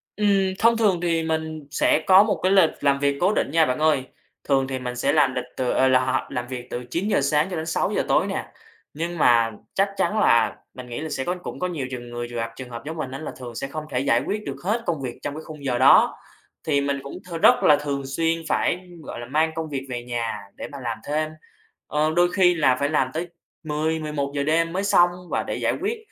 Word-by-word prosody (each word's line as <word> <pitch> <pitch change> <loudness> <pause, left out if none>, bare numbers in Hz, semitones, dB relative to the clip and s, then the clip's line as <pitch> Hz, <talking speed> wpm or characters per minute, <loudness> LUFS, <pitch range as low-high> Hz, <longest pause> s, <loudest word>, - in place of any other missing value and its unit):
Ừm, 200 -2 +2
thông 230 +1 +4
thường 205 -6 +2
thì 165 -2 +1
mình 160 -2 -3
sẽ 155 - +2
có 190 +1 +8
một 210 -1 -1
cái 185 - +3
lịch 190 -5 +6
làm 140 -1 +2
việc 140 0 +1
cố 185 +4 +3
định - - 0
nha, 165 0 +4
bạn 125 -1 -1
ơi. 155 -4 +3 0.4
Thường 135 -2 +1
thì 130 -1 -3
mình 125 -1 -5
sẽ 135 +3 +1
làm 140 -4 +3
lịch 125 -1 -2
từ 125 -1 0
ờ, 130 - +3
là, 130 0 +5
hò 130 - -1
làm 120 -2 -4
việc 125 -1 -6
từ 120 - -4
9:00 190 +2 +1
sáng 150 +3 +2
cho 185 - -4
đến 160 -1 -3
6:00 165 - 0
tối - - +3
nè. - - -3 0.5
Nhưng 170 +3 -4
mà 115 -6 +4 0.2
chắc 195 +1 +2
chắn 215 - +1
là 115 - +4 0.2
mình 125 -1 -9
nghĩ 120 - -5
là 160 - -4
sẽ 135 - -2
có 175 +6 -1
cũng - - -6
có 180 - 0
nhiều 150 -8 -4
trường 120 -1 -6
người 120 0 -5
trường 120 - -6
gặp 115 0 -3
trường 130 0 -8
hợp 115 -1 -7
giống 160 +2 -5
mình 135 -5 -4
á, 135 - -6
là 155 - -5
thường 120 -2 -8
sẽ 135 - -3
không 155 +3 -6
thể 125 - 0
giải 135 - +2
quyết 210 +1 -2
được - - -4
hết 220 +5 0
công 160 -5 -1
việc 125 -3 -6
trong 145 - -3
cái 155 - -6
khung 150 -2 -10
giờ 125 -3 0
đó. 130 +2 +6 0.5
Thì 140 -2 +2
mình 140 0 -1
cũng 140 - -8 0.2
th - - -5
rất - - +6
là 150 - +7
thường 145 -1 -3
xuyên 165 +4 0
phải, 180 +1 0 0.2
gọi - - -7
là, 120 - -6
mang 155 +6 +1
công 160 -1 -4
việc 135 -2 -4
về 120 -1 -4
nhà 120 -3 -3 0.2
để - - -6
mà 140 - -8
làm 115 -2 -2
thêm. 155 +1 -1 0.6
Ờ, 155 +1 +1
đôi 175 0 +4
khi 180 -2 +4
là 140 -6 +3
phải 140 +2 -1
làm 135 -4 +1
tới 170 +3 -3 0.4
10:00-11:00 150 -2 -2
giờ 140 - 0
đêm 165 +2 +1
mới 190 +2 -1
xong 175 -3 +5 0.2
và - - 0
để - - -4
giải - - 0
quyết, 430 +4 -1
150 Hz, 255 wpm, -23 LUFS, 130-165 Hz, 0.6 s, có